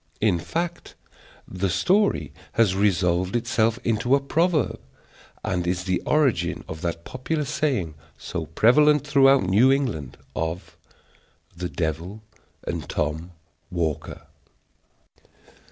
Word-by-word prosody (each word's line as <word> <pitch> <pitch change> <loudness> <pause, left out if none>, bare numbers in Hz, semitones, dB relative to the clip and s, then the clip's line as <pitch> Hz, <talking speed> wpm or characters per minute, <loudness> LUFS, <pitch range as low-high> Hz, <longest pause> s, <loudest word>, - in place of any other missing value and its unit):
In 100 -5 +2
fact, 170 - -4 0.5
the 95 +1 -2
story 195 - +1 0.2
has 110 -5 +3
resolved 90 -1 +1
itself 115 -1 +1
into 115 +3 +2
a - - +2
proverb, 160 +3 +1 0.6
and 90 -2 -1
is 90 0 -1
the 95 -1 -1
origin 125 - +1
of 80 0 -7
that 85 -1 -3
popular 150 +4 -3
saying, 125 - -1 0.2
so - - -5
prevalent 150 +5 +4
throughout 135 -3 +5
New 105 +8 +4
England, 115 - -1 0.2
of 80 +2 -4 0.8
"The 90 +1 -4
devil 85 +6 -3 0.4
and - - -4
Tom 80 +4 -2 0.4
Walker." 85 -4 -3 0.9
DR. - - -32
105 Hz, 115 wpm, -24 LUFS, 85-135 Hz, 0.9 s, throughout